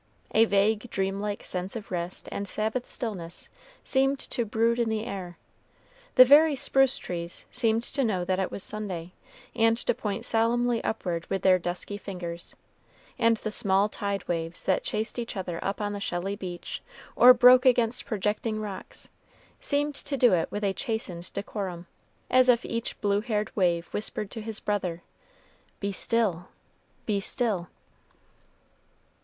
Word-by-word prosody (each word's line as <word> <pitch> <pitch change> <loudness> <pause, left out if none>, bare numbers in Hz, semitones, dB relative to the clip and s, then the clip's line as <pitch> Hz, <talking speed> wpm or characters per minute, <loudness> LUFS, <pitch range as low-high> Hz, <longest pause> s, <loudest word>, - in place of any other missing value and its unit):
A 225 - +6
vague, 215 +3 +2
dreamlike 200 +1 -2
sense 185 +3 -3
of 220 -3 -7
rest 175 0 -3
and 200 - -4
Sabbath 220 +5 -2
stillness 180 -8 -5 0.3
seemed 270 +1 +2
to 240 - 0
brood 230 +2 +1
in 235 -1 +1
the 220 0 -1
air. 180 -4 -6 0.8
The 255 - +10
very 295 +3 +7
spruce 270 0 +3
trees 170 -1 -5
seemed 230 -2 +1
to 275 +2 0
know 190 -7 0
that 185 +1 0
it 190 - 0
was 200 - -5
Sunday, 185 -5 -4 0.4
and 225 -1 +3
to - - 0
point 210 -4 -4
solemnly 235 +1 +1
upward 175 -6 -2
with 195 -1 -2
their 185 -1 +5
dusky 180 +4 -4
fingers; 175 -4 -5 0.6
and 230 -1 +4
the 215 - -4
small 200 -2 +3
tide 200 -2 -3
waves 165 0 -3
that 190 - +2
chased 220 +3 -2
each 230 -3 -5
other 175 -3 -4
up 195 +2 -2
on 205 -1 -2
the 205 - -4
shelly 195 +1 -2
beach, 180 -3 -6 0.3
or 250 - +9
broke 250 +1 +7
against 240 -1 +2
projecting 215 +1 -1
rocks, 205 -3 -6 0.5
seemed 290 0 0
to 280 0 -3
do 245 -5 +5
it 165 -2 +1
with 205 - -4
a 195 -1 +1
chastened 190 -7 -3
decorum, 195 -3 -4 0.4
as 255 0 +4
if 240 -1 +4
each 230 0 -3
blue 205 0 +2
haired 215 -2 -2
wave 175 -3 +2
whispered 210 -1 -4
to 225 - -5
his 215 0 -5
brother, 180 -5 -2 0.8
"Be 200 0 -2
still 195 -4 0 0.6
be 205 -2 +1
still." 205 -5 0
210 Hz, 155 wpm, -27 LUFS, 185-230 Hz, 0.8 s, The